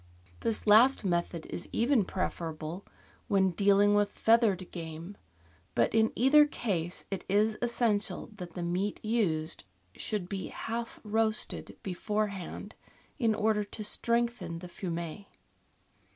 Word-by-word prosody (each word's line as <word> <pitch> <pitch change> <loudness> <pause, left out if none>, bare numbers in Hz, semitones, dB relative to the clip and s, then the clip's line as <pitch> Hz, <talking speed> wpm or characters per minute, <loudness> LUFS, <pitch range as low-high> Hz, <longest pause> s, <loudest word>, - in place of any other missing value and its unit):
This 225 -2 -1
last 225 +3 +6
method 170 -2 -1
is 175 - -6
even 235 -3 +3
preferable 170 -1 -4 0.4
when 190 -2 +3
dealing 200 +3 +4
with 205 0 +3
feathered 220 -6 +2
game, 165 +2 -7 0.6
but 115 - +2
in 220 0 +4
either 295 +5 +6
case 180 - -3
it 195 - -3
is 210 +2 +3
essential 225 -5 0
that 175 -4 -8
the 175 - -3
meat 185 +4 -1
used 170 -8 0 0.3
should 205 -5 -3
be 195 0 -4
half 230 +1 -5
roasted 220 0 -1
beforehand, 200 +1 -3 0.5
in 225 -4 +2
order 215 0 +2
to 215 +1 -8
strengthen 235 -4 0
the 180 +2 -8
fumet. 170 +1 -5
205 Hz, 125 wpm, -30 LUFS, 175-225 Hz, 0.6 s, last